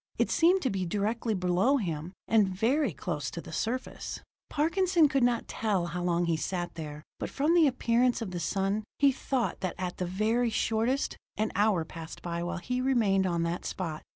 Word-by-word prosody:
It - - +1
seemed 360 +3 +4
to 260 - +1
be 190 -1 -1
directly 210 +5 -1
below 185 +9 +2
him, 170 - -3
and 215 -3 +4
very 230 +8 +1
close 150 -1 -3
to - - -6
the 165 - -9
surface. 245 +9 -3 0.3
Parkinson 335 +2 +3
could 275 -1 +1
not 240 -1 +2
tell 200 -6 0
how 175 +1 -4
long 175 0 +1
he 165 -1 +1
sat 175 +1 -3
there, 150 -2 -7 0.2
but - - -3
from 295 +4 +1
the 335 -3 +6
appearance 245 -1 +2
of 220 -5 -4
the 175 - -3
sun, 195 +5 0
he 280 -1 +5
thought 250 -6 -2
that 185 -3 -3
at 180 -1 -4
the 180 - -2
very 220 +6 +1
shortest, 230 +4 0 0.2
an 215 +1 0
hour 200 -5 +2
passed 165 0 -9
by 170 -1 -3
while 175 +1 -3
he 250 +8 -2
remained 215 -8 +2
on 170 -2 0
that 170 +1 -2
spot. 160 -5 -4
205 Hz, 195 wpm, -29 LUFS, 175-250 Hz, 0.3 s, the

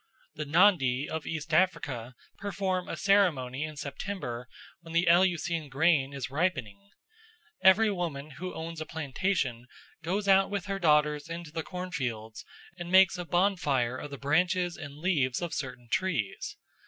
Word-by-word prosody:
The 155 - -5
Nandi 150 -5 +4
of 160 -1 -5
East 160 0 -4
Africa 135 -9 +1 0.2
perform 190 -2 -2
a - - -4
ceremony 155 -10 +2
in 155 0 -5
September 140 - -5 0.3
when 165 -1 -11
the 170 +1 +4
eleusine 170 -3 +2
grain 140 -1 +2
is 135 -2 -5
ripening. 130 - -2 0.7
Every 210 +3 +6
woman 155 -6 -4
who 185 +1 -4
owns 165 0 -6
a 155 - -5
plantation 145 -5 -2 0.3
goes 195 +5 -2
out 195 0 +5
with 200 -2 -3
her 195 0 -3
daughters 150 -2 +2
into 165 -2 -6
the 165 +1 -3
cornfields 130 - -5 0.4
and 175 0 -6
makes 190 0 +6
a 175 - -4
bonfire 170 -10 +1
of 140 - -6
the 140 - -7
branches 175 +5 +1
and 145 -2 -9
leaves 150 -7 +1
of 175 -2 -4
certain 125 -3 -5
trees. 120 - -2
160 Hz, 150 wpm, -29 LUFS, 140-185 Hz, 0.7 s, Every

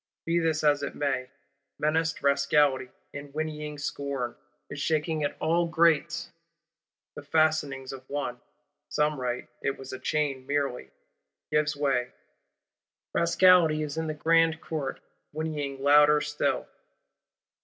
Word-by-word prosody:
Be 170 +1 +2
this 160 -2 0
as 145 -1 +3
it 140 - -4
may, 130 -3 -1 0.5
menaced 160 +1 0
Rascality, 140 -2 +3 0.2
in 145 0 -7
whinnying 150 -1 -4
scorn, 140 -4 -3 0.3
is 145 - -7
shaking 155 0 0
at 145 - -2
all 170 +2 +2
Grates: 170 0 +2 0.8
the - - -7
fastening 150 -3 +1
of 130 0 -11
one 130 -4 -3 0.5
(some 150 -1 +1
write, 125 -1 -3
it 140 - -1
was 135 -1 -9
a 130 - -6
chain 135 -2 -1
merely) 140 - -1 0.6
gives 150 -1 +1
way; 135 -4 0 1.0
Rascality 170 -2 +5
is 150 -1 -4
in 160 0 -2
the 155 - -3
Grand 165 +1 +3
Court, 155 -5 -4 0.3
whinnying 145 -3 -4
louder 150 +1 +6
still. 150 0 -1
150 Hz, 125 wpm, -28 LUFS, 140-155 Hz, 1.0 s, louder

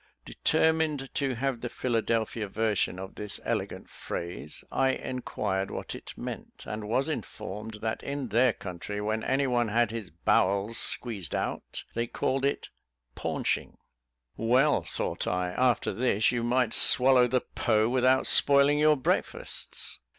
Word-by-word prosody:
Determined 160 -4 +1
to 135 -3 -1
have 130 -1 -2
the 120 - -3
Philadelphia 115 -3 -1
version 105 -2 0
of 95 0 -7
this 105 -1 -1
elegant - - -3
phrase, 85 -4 -6
I 135 0 +2
inquired 100 -6 -3
what - - -5
it - - -9
meant, - - -7
and 105 -1 -5
was 130 +5 +1
informed, 110 -7 -5
that 110 0 -2
in 140 -3 -4
their 120 +4 +4
country 100 +1 -6
when 110 +1 -1
any 135 +1 +1
one 120 -2 +1
had 115 +1 +2
his 115 -3 -5
bowels 100 +7 +1
squeezed 105 -10 -1
out, - - -3
they 115 +1 -1
called 135 +3 -1
it 140 - -2 0.4
"paunching." - - -2 0.6
"Well," 130 +6 +3
thought - - -3
I, 90 0 0
"after 125 +2 +1
this, 110 -1 +2
you 120 -1 -1
might 120 -1 +1
swallow 125 -1 +5
the 125 +1 +1
Po 110 -1 +2
without 130 +1 +3
spoiling 140 +1 +6
your 150 0 +5
breakfasts." 130 - -2
120 Hz, 145 wpm, -28 LUFS, 105-130 Hz, 0.6 s, spoiling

